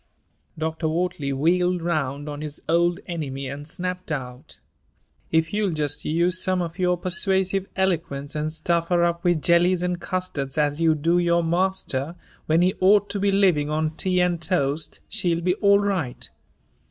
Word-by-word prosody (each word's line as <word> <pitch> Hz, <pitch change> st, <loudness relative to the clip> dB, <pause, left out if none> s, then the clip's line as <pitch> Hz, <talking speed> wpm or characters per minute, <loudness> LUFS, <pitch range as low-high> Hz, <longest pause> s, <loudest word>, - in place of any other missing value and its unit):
Dr. 160 Hz, +1 st, -2 dB
Wortley 160 Hz, -3 st, -1 dB
wheeled 175 Hz, +5 st, +1 dB
round 145 Hz, -4 st, -2 dB
on 145 Hz, 0 st, -5 dB
his 150 Hz, -1 st, -5 dB
old 170 Hz, +2 st, +2 dB
enemy 140 Hz, -6 st, -4 dB
and 140 Hz, +2 st, -7 dB
snapped 180 Hz, +1 st, -5 dB
out: 125 Hz, -4 st, -6 dB, 0.7 s
"If 160 Hz, +2 st, +1 dB
you'll 205 Hz, -4 st, 0 dB
just 150 Hz, -2 st, -2 dB
use 175 Hz, +4 st, +1 dB
some 185 Hz, 0 st, +1 dB
of 170 Hz, +1 st, -4 dB
your 180 Hz, -1 st, +2 dB
persuasive 190 Hz, +1 st, 0 dB
eloquence 165 Hz, -7 st, -1 dB
and 155 Hz, 0 st, -2 dB
stuff 170 Hz, +1 st, 0 dB
her 175 Hz, -1 st, +2 dB
up 170 Hz, 0 st, 0 dB
with 175 Hz, -4 st, +1 dB
jellies 175 Hz, +1 st, +3 dB
and 180 Hz, -1 st, -2 dB
custards 160 Hz, -8 st, -3 dB
as 150 Hz, +1 st, +1 dB
you 160 Hz, -1 st, +4 dB
do 165 Hz, +4 st, +2 dB
your 170 Hz, 0 st, +2 dB
master 170 Hz, -4 st, -1 dB, 0.3 s
when 160 Hz, +2 st, +3 dB
he 185 Hz, +1 st, +3 dB
ought 200 Hz, +2 st, +4 dB
to 200 Hz, -, -2 dB
be 200 Hz, 0 st, +2 dB
living 180 Hz, -7 st, +3 dB
on 155 Hz, 0 st, 0 dB
tea 180 Hz, +3 st, 0 dB
and 175 Hz, -2 st, +1 dB
toast, 155 Hz, -3 st, -1 dB
she'll 175 Hz, -6 st, -1 dB
be 180 Hz, +1 st, +2 dB
all 200 Hz, -2 st, +5 dB
right." 190 Hz, -11 st, -2 dB
170 Hz, 165 wpm, -24 LUFS, 155-180 Hz, 0.7 s, all